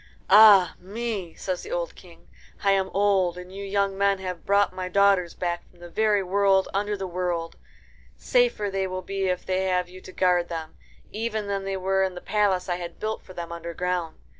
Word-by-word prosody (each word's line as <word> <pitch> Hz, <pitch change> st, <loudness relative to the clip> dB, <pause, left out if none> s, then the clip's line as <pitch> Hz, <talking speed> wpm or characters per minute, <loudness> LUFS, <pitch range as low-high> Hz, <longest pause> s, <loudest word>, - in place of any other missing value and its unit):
"Ah 205 Hz, -3 st, +8 dB
me!" 200 Hz, -2 st, -5 dB
says 185 Hz, -2 st, -3 dB
the 430 Hz, -, -9 dB
old -, -, -2 dB
King, -, -, -17 dB, 0.4 s
"I 200 Hz, -, +4 dB
am 195 Hz, -1 st, +1 dB
old, 195 Hz, -3 st, +2 dB
and 180 Hz, +1 st, -10 dB
you 200 Hz, +1 st, -6 dB
young 200 Hz, 0 st, 0 dB
men 200 Hz, 0 st, +2 dB
have 185 Hz, -2 st, -6 dB
brought 200 Hz, -1 st, +3 dB
my 185 Hz, 0 st, -4 dB
daughters 195 Hz, -2 st, +3 dB
back 175 Hz, -1 st, -3 dB
from 180 Hz, -, -25 dB
the 175 Hz, 0 st, -11 dB
very 210 Hz, 0 st, +2 dB
world 195 Hz, 0 st, +2 dB
under 205 Hz, +1 st, -1 dB
the 190 Hz, -, -4 dB
world. 175 Hz, -2 st, -3 dB, 0.6 s
Safer 485 Hz, -, +1 dB
they 195 Hz, 0 st, -1 dB
will 185 Hz, 0 st, -5 dB
be 195 Hz, +1 st, -2 dB
if 180 Hz, -1 st, -2 dB
they 190 Hz, 0 st, 0 dB
have 180 Hz, -1 st, 0 dB
you 185 Hz, +1 st, -12 dB
to 185 Hz, -, -11 dB
guard 180 Hz, -2 st, +2 dB
them, 165 Hz, -, -6 dB, 0.4 s
even 220 Hz, -1 st, -3 dB
than 200 Hz, -1 st, -3 dB
they 195 Hz, 0 st, -2 dB
were 190 Hz, +1 st, +1 dB
in 190 Hz, -1 st, 0 dB
the -, -, -6 dB
palace 200 Hz, -2 st, +1 dB
I 175 Hz, -1 st, -1 dB
had 175 Hz, -1 st, -8 dB
built 220 Hz, 0 st, -3 dB
for 185 Hz, -, -14 dB
them 170 Hz, -1 st, -6 dB
underground. 170 Hz, 0 st, -3 dB
190 Hz, 205 wpm, -25 LUFS, 180-200 Hz, 0.6 s, Ah